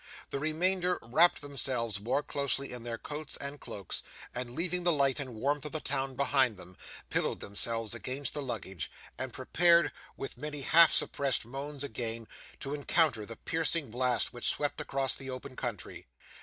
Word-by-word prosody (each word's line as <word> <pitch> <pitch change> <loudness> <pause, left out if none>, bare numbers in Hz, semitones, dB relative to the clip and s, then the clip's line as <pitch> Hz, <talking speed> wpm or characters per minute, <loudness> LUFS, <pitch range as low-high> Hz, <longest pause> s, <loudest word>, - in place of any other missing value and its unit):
The 140 - -1
remainder 180 +4 +2
wrapped 135 +10 +4
themselves 125 -6 0
more 125 +7 0
closely 140 -1 -1
in 125 - -5
their 115 0 -4
coats 150 +4 -5
and 140 +1 -4
cloaks, 100 -4 -5 0.3
and 125 0 -4
leaving 180 +2 -1
the 175 0 +3
light 140 -3 +2
and 130 -4 -5
warmth 140 +5 0
of 150 - -5
the 155 - 0
town 135 -2 -1
behind 135 -5 +3
them, 90 0 -11 0.4
pillowed - - +1
themselves 115 +2 +1
against 130 +3 -2
the 150 - -1
luggage, 95 - -4 0.3
and 130 -1 -2
prepared, 170 +7 +4 0.3
with 135 -2 -6
many 150 0 -3
half 165 +4 +8
suppressed 135 -5 +1
moans, 140 +3 -5
again 115 -3 -3 0.3
to 140 - -3
encounter 145 -6 +2
the 115 - -5
piercing 160 -1 0
blast 125 0 +1
which 120 - -2
swept 145 -1 -1
across 135 -1 0
the 135 -1 -5
open 130 +1 -6
country. 120 -7 -5
135 Hz, 170 wpm, -31 LUFS, 120-150 Hz, 0.4 s, half